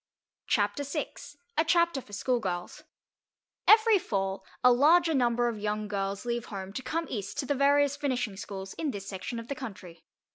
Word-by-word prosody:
CHAPTER 205 +6 +1
SIX: 280 - -5 0.2
A - - +5
CHAPTER 340 -3 +2
FOR 210 - -18
SCHOOLGIRLS 200 -5 -2 0.9
Every 435 -1 +7
Fall 195 - -2 0.2
a 250 - +8
larger 320 +6 +5
number 240 -3 +2
of 230 -3 -3
young 210 0 -2
girls 200 +1 -3
leave 235 -1 -2
home 195 -2 -7
to 260 - -4
come 325 +6 -2
East 200 -5 -5
to - - -1
the 285 - +1
various 285 +1 +3
Finishing 250 -7 -1
Schools 190 -1 -7
in 315 - 0
this 200 -6 -6
section 200 +5 -5
of 230 0 -7
the 280 - -2
country. 195 - -9
240 Hz, 175 wpm, -29 LUFS, 200-285 Hz, 0.9 s, a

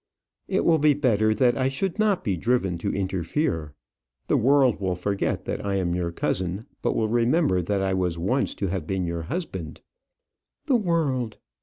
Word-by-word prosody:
"It - - 0
will 165 -2 +4
be 150 -1 +4
better 110 -6 +2
that 120 +2 +3
I 130 0 +1
should 170 +9 -2
not 210 -3 +2
be 100 - 0
driven 95 -3 0
to - - -1
interfere. 95 - -2 0.5
The - - +1
world 135 -1 +4
will 95 -2 -1
forget 100 +3 -2
that - - -3
I 100 -1 -1
am 90 -3 0
your 85 -1 -1
cousin, 95 +4 -2 0.2
but - - 0
will 110 - +1
remember 120 - +2
that 95 +2 -1
I 95 0 0
was 90 -3 0
once 120 +11 0
to 100 - -2
have 90 -4 -3
been 95 -2 -1
your 85 0 -3
husband." 90 - -5 0.8
"The 270 - +3
world! 150 - 0
105 Hz, 180 wpm, -25 LUFS, 90-135 Hz, 0.8 s, will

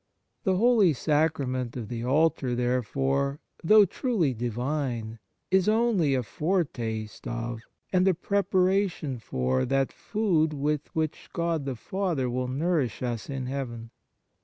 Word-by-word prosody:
The 190 -2 +3
Holy 215 -4 +4
Sacrament 140 -4 0
of 115 -4 -5
the 115 +1 -4
Altar, 140 -1 +2
therefore, 135 +3 0 0.2
though 210 +5 +7
truly 195 - 0
Divine, 120 -1 -3 0.3
is 190 +1 +4
only 215 - +3
a 130 - 0
foretaste 120 - -2
of, 115 -1 -4 0.3
and 185 +1 +4
a 190 - +4
preparation 185 -6 +1
for, 65 - 0
that 135 +1 0
food 180 -8 +1
with 150 +1 -1
which 160 -1 -2
God 170 -4 -1
the 135 -2 -3
Father 160 - -2
will 125 +1 -1
nourish 145 -1 0
us 120 -1 -3
in 135 -2 -3
heaven. 120 -4 -5
140 Hz, 130 wpm, -27 LUFS, 125-175 Hz, 0.3 s, though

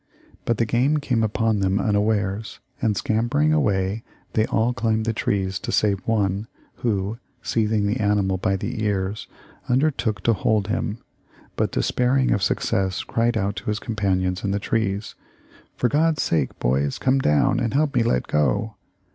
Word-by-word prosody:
But 115 - +1
the 115 - +2
game 125 +7 +2
came 125 -6 0
upon 110 0 +1
them 95 0 +1
unawares, 105 0 0 0.2
and 110 -4 +1
scampering 120 +10 +1
away 100 -7 +1 0.3
they 110 0 +2
all 115 +3 +1
climbed 110 -2 0
the 115 - 0
trees 95 -2 -1
save 100 -2 +2
one, 105 -1 0 0.3
who, 105 -1 -1 0.2
seizing 110 -2 +1
the 105 +4 0
animal 100 -3 +1
by 95 +1 +1
the 110 +4 -3
ears, 100 0 -1 0.4
undertook 125 -6 +1
to 115 - +4
hold 105 -1 0
him, 105 - -1 0.6
but - - 0
despairing 130 +1 +1
of 100 - +1
success 95 +1 0
cried 115 0 0
out 100 0 -1
to - - -6
his 105 0 0
companions 95 -4 -1
in 100 - 0
the 100 - 0
trees, 105 -1 -1 0.6
'For 125 - +2
God's 155 +2 +2
sake, 75 -5 0
boys, 70 +3 0
come 135 +1 +2
down 75 - +2
and 120 0 -1
help 145 0 +2
me 125 - +3
let 115 - +1
go.' 75 - 0
110 Hz, 160 wpm, -23 LUFS, 95-120 Hz, 0.6 s, to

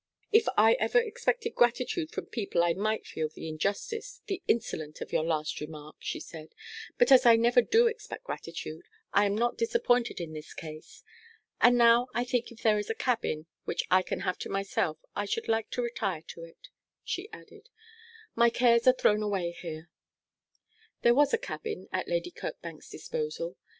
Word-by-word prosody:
'If 445 +1 +5
I - - +7
ever - - +2
expected 465 0 -1
gratitude 250 +7 +1
from - - -5
people 200 -6 -1
I 170 -1 +3
might 215 +4 -1
feel 155 -1 -3
the 160 - -9
injustice 450 - -3
the 390 -3 -3
insolence 155 -9 -1
of - - -7
your - - +2
last 155 -2 -2
remark,' 150 0 -9
she - - -4
said; 160 -2 -11 0.4
'but 485 - +4
as 260 -1 +8
I 235 -2 +8
never 240 +2 +4
do 450 - +4
expect 465 +2 -3
gratitude, 165 - -7 0.3
I 205 +1 +4
am 200 - 0
not 240 +2 0
disappointed 250 - +1
in 165 -2 -6
this 155 -1 -9
case. 155 -1 -10 0.6
And 245 0 +6
now 235 +1 +6
I 240 - +1
think 245 -1 -1
if 230 - -14
there 215 -2 +4
is 210 - -5
a 225 - -1
cabin 225 -12 -1 0.2
which - - -1
I 185 +1 +6
can - - -4
have 185 -2 -2
to - - -5
myself 195 -5 -1 0.2
I 205 - -1
should 225 +3 -3
like 225 -1 0
to 245 - -2
retire 200 -9 -2
to 165 - -8
it,' 165 - -17 0.3
she 380 +4 -4
added. 440 +1 -14 0.6
'My 235 0 +5
cares 235 0 +3
are 255 - +9
thrown 210 -4 +2
away 195 -5 -1
here.' 165 -1 -8 1.1
There 235 - +6
was 285 +2 +4
a - - +3
cabin 455 -2 -6
at - - -1
Lady - - -1
Kirkbank's - - -8
disposal. 485 +1 -4
230 Hz, 180 wpm, -29 LUFS, -, 1.1 s, are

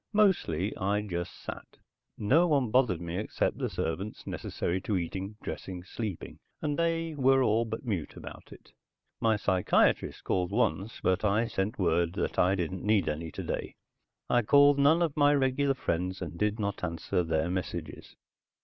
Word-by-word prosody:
Mostly, 175 - +2
I 100 +2 0
just 85 -4 -4
sat. - - -8 0.4
No 145 +12 +4
one 140 -8 +2
bothered 125 -9 +3
me 85 +2 -3
except 105 - -1
the - - -1
servants 95 +7 -4
necessary 90 +2 -3
to 100 0 -1
eating, 95 +4 -4
dressing, 90 -2 -6
sleeping, 100 -1 -6 0.2
and 150 -2 -1
they 165 0 0
were 135 -2 +4
all 115 0 +2
but 110 +3 -6
mute 95 -10 -3
about - - -10
it. - - -15 0.5
My 110 -1 +3
psychiatrist 95 -3 +2
called 90 -1 0
once, 105 -1 -1
but 95 +2 +1
I 105 +2 +2
sent 100 -1 -2
word 85 -2 +1
that - - -2
I 95 +2 +4
didn't 90 0 -3
need 105 -2 +2
any 80 +2 -3
today. - - -5 0.5
I 120 - +3
called 145 +4 +5
none 155 +5 +5
of 160 -4 -1
my 145 0 +4
regular 135 0 +1
friends 90 -5 -2
and 85 -3 -6
did 105 +4 0
not 100 -2 -3
answer 85 0 -1
their 80 0 0
messages. 85 -4 -5
105 Hz, 165 wpm, -29 LUFS, 90-130 Hz, 0.5 s, called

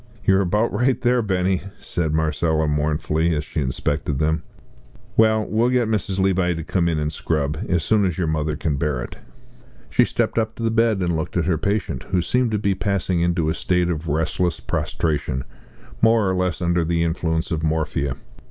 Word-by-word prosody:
"You're 95 0 +4
about 105 +5 +1
right 125 +3 +2
there, 125 -1 +2
Benny," 95 -3 0 0.2
said 80 -3 -2
Marcella, 80 0 +1
mournfully, 75 +2 0
as 75 - -1
she 75 - -3
inspected 70 +2 -1
them; 80 +2 +1 0.7
"well, 110 -1 +4
we'll 115 +3 +1
get 125 -2 +2
Mrs. 100 -3 -1
Levi 95 -2 +2
to 80 - -4
come 85 +1 +1
in 80 - 0
and 75 0 -1
scrub 75 0 -1
as 90 -4 +1
soon 110 +3 +3
as 90 -4 -1
your 90 - 0
mother 80 -1 -1
can 75 -1 -1
bear 70 -5 -1
it." - - -9 0.7
She - - +5
stepped - - 0
up 110 0 -2
to 115 - -6
the 115 - +1
bed 115 -3 +2
and 85 -2 0
looked 80 +3 -3
at 85 - +1
her 85 -3 +1
patient, 100 +2 -1
who 90 -3 +1
seemed 125 +7 +1
to 110 - 0
be 100 -1 +1
passing 95 -2 -1
into 85 -2 +1
a 80 - +1
state 90 0 0
of 80 0 -4
restless 80 +3 0
prostration, 75 -5 -2 0.6
more 115 -2 +4
or 95 - +1
less 90 -1 -1
under 85 0 +2
the 85 0 +1
influence 80 0 -1
of 80 -2 -1
morphia. 75 -4 -1
85 Hz, 195 wpm, -22 LUFS, 80-100 Hz, 0.7 s, She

